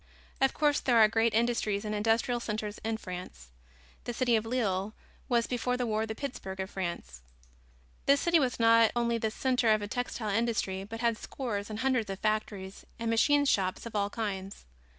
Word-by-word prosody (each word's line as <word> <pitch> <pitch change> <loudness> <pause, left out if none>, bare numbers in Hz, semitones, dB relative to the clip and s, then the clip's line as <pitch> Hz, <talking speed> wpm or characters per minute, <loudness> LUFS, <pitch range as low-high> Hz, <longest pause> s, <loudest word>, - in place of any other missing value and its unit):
Of 270 - +3
course, 295 -1 +2
there 245 -3 +2
are 220 -1 +8
great 225 +1 +1
industries 225 -3 +1
and 210 - -2
industrial 225 +3 +1
centers 215 -2 -4
in 220 0 -1
France. 180 - -8 0.6
The 240 - -4
city 245 -1 +2
of 220 0 0
Lille 215 -4 -1 0.3
was, 235 -2 +3
before 250 0 -1
the 250 - -1
war, 220 0 -1
the 220 - -4
Pittsburg 215 -8 -6
of 190 +1 -4
France. 170 - -5 0.9
This 280 0 +5
city 340 -1 +4
was 255 -4 0
not 230 -1 +6
only 235 -1 +1
the 220 - 0
center 250 0 +1
of 215 - +4
the 205 - -3
textile 235 -2 -3
industry, 205 -3 0
but 225 +2 -7
had 230 -2 +1
scores 210 -6 -4
and 215 0 -4
hundreds 255 -5 +1
of 195 - -3
factories 210 -2 -2
and 230 0 -2
machine 285 +5 +4
shops 190 -7 +1
of 230 - -7
all 200 -1 +1
kinds. 200 -3 -5
225 Hz, 190 wpm, -30 LUFS, 205-240 Hz, 0.9 s, are